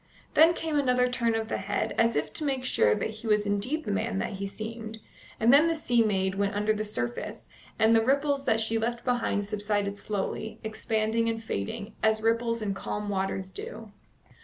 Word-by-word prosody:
Then 330 +2 +6
came 315 -3 -1
another 250 -2 +3
turn 235 -2 0
of 220 0 -1
the - - -2
head, 195 +1 -1
as 230 0 +3
if 145 - -1
to - - -4
make 270 -3 -1
sure 105 - +3
that - - -2
he 220 +1 -8
was 210 -1 +3
indeed 205 +10 -1
the 210 - -3
man 215 0 -1
that 195 - -2
he 200 0 -4
seemed, 220 +2 -6 0.4
and 230 +3 +5
then 300 +4 +7
the 330 - +1
sea 245 -6 +2
maid 190 -3 +1
went 200 +1 -1
under 210 +1 +2
the 215 0 -2
surface, 120 - -4 0.3
and 220 +1 +5
the 225 - +4
ripples 280 +2 +1
that 225 -4 +3
she 225 0 0
left 235 +1 -2
behind 245 -5 0
subsided 205 -1 -1
slowly, 215 +1 -3
expanding 220 +1 0
and 225 0 -3
fading, 205 - -4
as 220 0 +2
ripples 230 0 +1
in 200 -2 -1
calm 205 +2 -4
waters 190 -1 -2
do. 215 +3 -8
220 Hz, 200 wpm, -28 LUFS, 205-235 Hz, 0.4 s, then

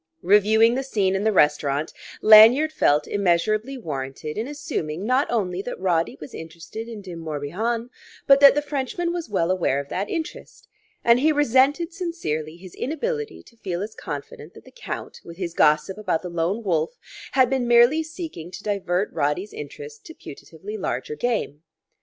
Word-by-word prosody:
Reviewing 215 +4 +5
the 260 - -1
scene 200 -8 0
in 195 - -1
the 220 - +3
restaurant, 150 -4 +1 0.3
Lanyard 225 +8 +8
felt 150 - +2
measurably 210 +7 0
warranted 150 - -5
in 220 +3 -3
assuming 265 - -4
not 255 +5 +1
only 190 -6 -1
that 245 - -6
Roddy 175 -3 0
was 150 - -10
interested 165 +7 -8
in 220 -3 -8
De 185 -2 -8
Morbihan, 170 - -3 0.3
but 275 -1 +6
that 280 0 +8
the 295 - 0
Frenchman 295 +5 -3
was 345 -7 -5
well 185 -4 0
aware 170 -7 +1
of 140 0 -7
that 195 +3 -3
interest. 325 -2 -6 0.4
And 235 +1 +5
he 310 +4 +3
resented 290 +4 +2
sincerely 165 - -4
his 180 0 -13
inability 445 - -4
to 235 - -21
feel 185 -3 -4
as 215 +1 -7
confident 145 -2 -8
that - - -15
the - - -15
Count, - - -7
with 170 0 -11
his 175 -3 -4
gossip 155 +6 +2
about 185 -6 -1
the 180 - -5
Lone 175 +6 -2
Wolf, 170 +3 -1 0.4
had 260 -2 +5
been 260 -1 -1
merely 240 +6 +5
seeking 315 - -7
to 190 - -10
divert 200 -1 -1
Roddy's 160 +8 -1
interest 145 0 -9
to 320 - -11
putatively 425 +1 -9
larger 450 - -3
game. 230 - -2
210 Hz, 170 wpm, -23 LUFS, 165-265 Hz, 0.4 s, Lanyard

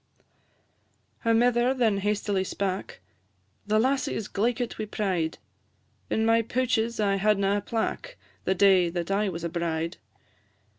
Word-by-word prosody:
Her 230 -1 +1
mither 240 +2 +3
then 225 -6 +2
hastily 205 -1 0
spak 190 0 -4 0.7
"The 215 0 +2
lassie 260 +4 +1
is 215 - -3
glaikit 235 +3 -1
wi' 215 - -2
pride; 185 -6 -2 0.7
In 220 - +1
my 225 0 +4
pouches 235 -1 0
I 200 -2 +2
hadna 200 0 +2
a - - -2
plack 235 - -3 0.3
The 190 - +1
day 190 -2 +5
that 175 +1 -3
I 200 +1 +1
was 170 -2 -6
a 170 - -1
bride. 165 0 -2
210 Hz, 140 wpm, -27 LUFS, 190-230 Hz, 0.7 s, day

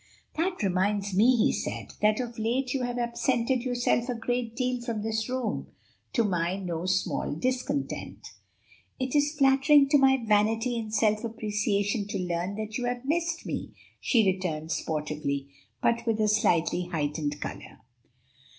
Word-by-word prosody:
"That 350 - -1
reminds 195 +1 0
me," 230 +7 +5
he 225 - +3
said, - - -4
"that 215 +2 +3
of 240 -2 -4
late 250 +4 0
you 270 - -1
have 245 0 -2
absented 240 +1 0
yourself 245 0 0
a 250 - -1
great 235 0 -2
deal 255 -1 -1
from 230 -3 -3
this 220 +1 -1
room; 255 -4 -2 0.5
to 235 - +3
my 180 -3 0
no 180 -3 -4
small 185 -5 0
discontent." 260 - -3 0.7
"It 260 +1 -2
is 290 +1 +2
flattering 275 +1 +5
to 290 0 +5
my 265 0 +5
vanity 220 +3 +2
and 220 -1 -6
self 215 0 +2
appreciation 210 -2 -1
to - - -3
learn 180 +1 -2
that 215 +2 -4
you 245 - -2
have 245 +1 -3
missed 335 +3 -1
me," - - -5 0.2
she 230 -5 +3
returned 175 -4 -1
sportively, 150 -3 -2 0.3
but 235 0 +1
with 225 -1 +1
a 215 - +3
slightly 180 -4 +2
heightened 150 -3 -2
color. - - -7
225 Hz, 155 wpm, -28 LUFS, 190-250 Hz, 0.7 s, me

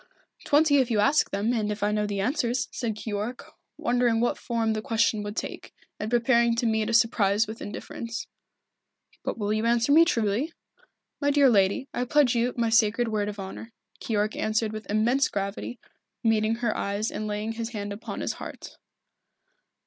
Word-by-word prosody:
"Twenty 290 0 +4
if 260 -3 +2
you 220 -3 +1
ask 275 +9 +3
them, 205 +4 0
and 215 -3 0
if 210 0 -4
I 210 - +2
know 210 0 0
the 200 -1 -2
answers," 250 +1 0
said 225 -3 -3
Keyork, 215 +3 -5 0.3
wondering 240 -1 +1
what 240 - +1
form 230 -2 -1
the 215 - -2
question 225 -1 +1
would 205 0 -5
take, - - -6 0.2
and 210 - -3
preparing 235 0 +3
to 235 - -1
meet 220 -1 +1
a - - -1
surprise 220 -2 +3
with 220 +1 -8
indifference. 230 +2 -6 1.0
"But - - -3
will 210 -1 -1
you 215 0 0
answer 235 +3 +2
me 320 +3 +8
truly?" 240 - 0 0.7
"My 285 - +2
dear 280 -2 +5
lady, 200 +5 +2
I 245 - -1
pledge 280 -1 +3
you 240 +1 +1
my 230 -1 +1
sacred 225 +1 +3
word 210 -1 -1
of 205 -1 -7
honour," 195 +4 -8 0.3
Keyork 215 -1 -1
answered 215 0 0
with 215 0 -7
immense 235 +6 +2
gravity, 200 +4 -4 0.5
meeting 220 0 +2
her 235 -2 -1
eyes 200 +2 -2
and 215 - -4
laying 210 +1 -2
his 225 0 -4
hand 205 -3 -5
upon 205 - -6
his - - -1
heart. - - -9
225 Hz, 180 wpm, -26 LUFS, 210-240 Hz, 1.0 s, me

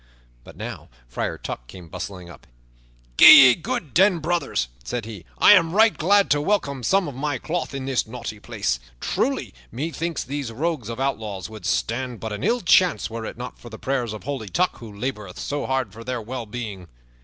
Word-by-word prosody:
But - - -14
now - - -7 0.2
Friar 60 - -3
Tuck - - -7
came 90 +5 -11
bustling 90 +1 -7
up. 85 - -14 0.7
"Gi' - - +9 0.2
ye - - +6
good 155 -1 -4
den, 185 +1 +5
brothers," 165 - -1 0.2
said 105 - -4
he. 110 -5 -9
"I - - +7
am 165 -4 +4
right 220 +2 +5
glad 200 +5 +3
to 145 0 +3
welcome 145 -7 0
some 195 - +2
of 145 - -6
my 145 +2 -2
cloth 160 +2 -3
in 135 -1 -4
this 130 -4 0
naughty 115 -2 -7
place. - - -2 0.2
Truly, - - -1 0.2
methinks 165 +5 -3
these 140 -2 -4
rogues 140 -2 -2
of 115 +1 -5
outlaws 110 -8 -3
would 110 -1 -7
stand 120 0 -1
but 110 -1 -5
an 105 - -5
ill 245 +1 +1
chance 180 -6 +3
were 115 0 -5
it - - -8
not 125 +1 -8
for 120 - -11
the 110 - -9
prayers 125 -3 -2
of 110 - -7
Holy 130 -6 -4
Tuck, 180 - 0
who 115 -3 -9
laboreth 105 -3 -5
so 145 0 -3
hard 130 -6 -1
for 115 +2 -10
their 125 0 -3
well 115 +1 -6
being." 105 -5 -6
125 Hz, 200 wpm, -23 LUFS, 110-155 Hz, 0.7 s, Gi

